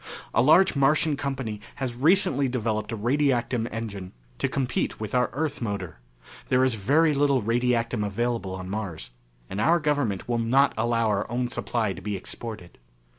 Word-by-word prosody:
A - - +4
large 155 +7 +5
Martian 150 +2 +3
company 135 -7 -4
has 130 -3 -3
recently 140 0 +3
developed 110 -3 -2
a 115 - -3
radiactum 120 -1 +1
engine 100 -5 -6 0.3
to - - 0
compete 130 -3 -1
with 110 -2 -5
our 125 -1 +2
Earth 150 0 -2
motor. 100 - -4 0.5
There 130 0 +4
is 130 -2 +2
very 145 +10 +3
little 140 -4 +2
radiactum 115 -1 +1
available 105 -1 -2
on 95 0 -7
Mars, 95 - -5 0.4
and 100 - -3
our 170 +7 +4
government 145 - -1
will 120 -1 0
not 130 +5 +3
allow 115 -1 +1
our 100 -1 -1
own 125 0 -1
supply 115 -4 -1
to 95 - -10
be 105 0 -3
exported. 105 -2 -8
120 Hz, 165 wpm, -26 LUFS, 105-135 Hz, 0.5 s, large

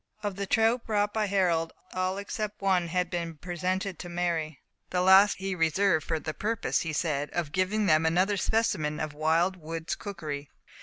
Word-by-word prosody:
Of 205 -2 -2
the 200 0 -4
trout 225 +3 +3
brought 205 -1 +1
by 215 -1 0
Harold, 175 -5 +1 0.2
all 185 +1 -1
except 210 +1 -4
one 185 -3 +2
had 180 +1 -1
been 175 - 0
cleaned, 170 -1 -4
and 150 - -26
presented 185 +1 -2
to 175 - -7
Mary; 170 -4 -2 0.3
the 180 0 0
last 190 +2 +7
he 195 0 -3
reserved 165 0 +2
for 160 - 0
the 155 0 -4
purpose, 220 +4 -1
he 165 - -3
said, 150 -2 -1
of 170 -4 -2
giving 190 +5 +1
them 155 -4 +4
another 180 +5 +2
specimen 170 -8 0
of 155 -1 -3
wild 165 +5 +1
woods' 165 0 -4
cookery. 150 -8 -6
180 Hz, 190 wpm, -28 LUFS, 160-200 Hz, 0.3 s, last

